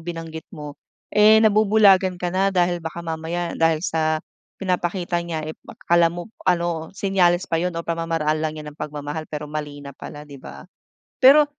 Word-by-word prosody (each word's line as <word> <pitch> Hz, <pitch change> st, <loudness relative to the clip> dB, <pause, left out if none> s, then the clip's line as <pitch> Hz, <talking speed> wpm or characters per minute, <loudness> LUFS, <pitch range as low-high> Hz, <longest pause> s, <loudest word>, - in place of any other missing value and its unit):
binanggit 165 Hz, -1 st, -7 dB
mo. 150 Hz, -5 st, -8 dB, 0.4 s
Eh, 210 Hz, +1 st, +7 dB
nabubulagan 205 Hz, -3 st, +4 dB
ka 175 Hz, 0 st, -3 dB
na 195 Hz, +1 st, +2 dB
dahil 175 Hz, -2 st, +1 dB
baka 165 Hz, +1 st, -6 dB
mamaya 165 Hz, +2 st, -3 dB
dahil 165 Hz, +1 st, +1 dB
sa 155 Hz, -1 st, 0 dB, 0.3 s
pinapakita 175 Hz, -2 st, -1 dB
niya, 165 Hz, -2 st, -4 dB
eh, 155 Hz, -, -5 dB, 0.3 s
kala 170 Hz, -1 st, +4 dB
mo 175 Hz, +5 st, -8 dB, 0.2 s
ano, 170 Hz, -2 st, 0 dB
senyales 185 Hz, -3 st, +2 dB
pa 165 Hz, -3 st, -1 dB
'yon 175 Hz, -1 st, -2 dB
o 170 Hz, -, -4 dB
pamamaraan 165 Hz, -2 st, -1 dB
lang 155 Hz, 0 st, -2 dB
niya 155 Hz, -, -7 dB
ng 145 Hz, -, -25 dB
pagmamahal. 150 Hz, +1 st, -5 dB
Pero 150 Hz, -1 st, -5 dB
mali 145 Hz, -1 st, -6 dB
na 140 Hz, -, -8 dB
pala, 150 Hz, +2 st, -10 dB
di 140 Hz, -3 st, -12 dB
ba? 70 Hz, +1 st, -11 dB, 0.6 s
Pero 280 Hz, +4 st, +8 dB
165 Hz, 170 wpm, -22 LUFS, 155-180 Hz, 0.6 s, Pero